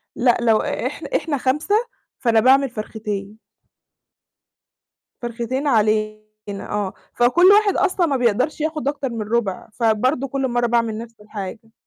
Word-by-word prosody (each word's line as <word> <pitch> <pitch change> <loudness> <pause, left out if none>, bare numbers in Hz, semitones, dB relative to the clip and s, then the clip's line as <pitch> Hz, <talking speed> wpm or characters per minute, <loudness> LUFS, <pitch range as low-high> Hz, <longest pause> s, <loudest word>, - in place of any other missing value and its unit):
لأ، 245 -1 +3
لو 225 -2 +4
إح - - -3
إحنا 300 -3 0
5 295 +10 0 0.4
فأنا 230 -4 +3
باعمل 265 +4 +4
فرختين. 215 -2 -5 1.8
فرختين 240 +4 -3
علينا 215 -3 +2 0.5
آه. 205 -2 -2 0.2
فكل 250 +9 +4
واحد 415 -1 +4
أصلًا 370 -1 +2
ما 285 -4 0
بيقدرش 250 +6 +1
ياخد 310 -2 -2
أكتر 280 -2 -1
من 230 -2 -4
ربع، 215 -4 -1
فبرضه 245 +5 +1
كل 270 0 -1
مرّة 240 -1 0
باعمل 230 -2 0
نفس 230 0 -9
الحاجة. 210 +1 -8
240 Hz, 130 wpm, -21 LUFS, 220-275 Hz, 1.8 s, لو